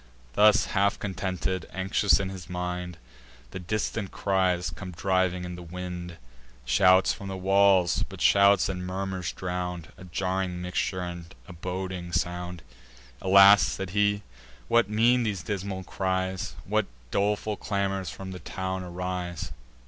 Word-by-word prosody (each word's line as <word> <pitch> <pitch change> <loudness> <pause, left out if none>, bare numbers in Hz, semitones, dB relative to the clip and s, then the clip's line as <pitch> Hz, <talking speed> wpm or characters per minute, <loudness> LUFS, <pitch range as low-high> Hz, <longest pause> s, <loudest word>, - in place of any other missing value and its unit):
Thus 105 - +5
half 100 0 +2
contented, 95 -2 -3
anxious 95 +2 +2
in 95 -1 -2
his 95 -2 -9
mind, 90 -1 -4 0.5
The 95 - -6
distant 105 +2 -2
cries 90 -3 0
come 85 +5 -8
driving 95 0 0
in 90 - -6
the 90 - -8
wind, 90 0 -6 0.5
Shouts 95 +6 +5
from 100 - -8
the 95 0 -4
walls, 95 -1 +4
but - - -10
shouts 100 -1 +5
in 90 -1 -4
murmurs 95 -1 -3
drown'd; 90 -2 -4
A 95 - -11
jarring 90 0 -2
mixture, 90 +1 -2
and 85 0 -7
a 90 - -9
boding 90 0 -5
sound. 90 0 -2 0.6
"Alas!" 100 +2 +8
said 95 -2 -2
he, 100 +1 +2 0.4
"what 115 -3 +3
mean 115 +4 +4
these 105 -7 -2
dismal 95 -1 -4
cries? 95 -1 -2
What - - +1 0.2
doleful 105 +1 0
clamours 95 -2 -2
from 95 -1 -7
the 90 - -7
town 95 0 -4
arise?" 90 -2 -4
95 Hz, 140 wpm, -27 LUFS, 90-100 Hz, 0.6 s, Alas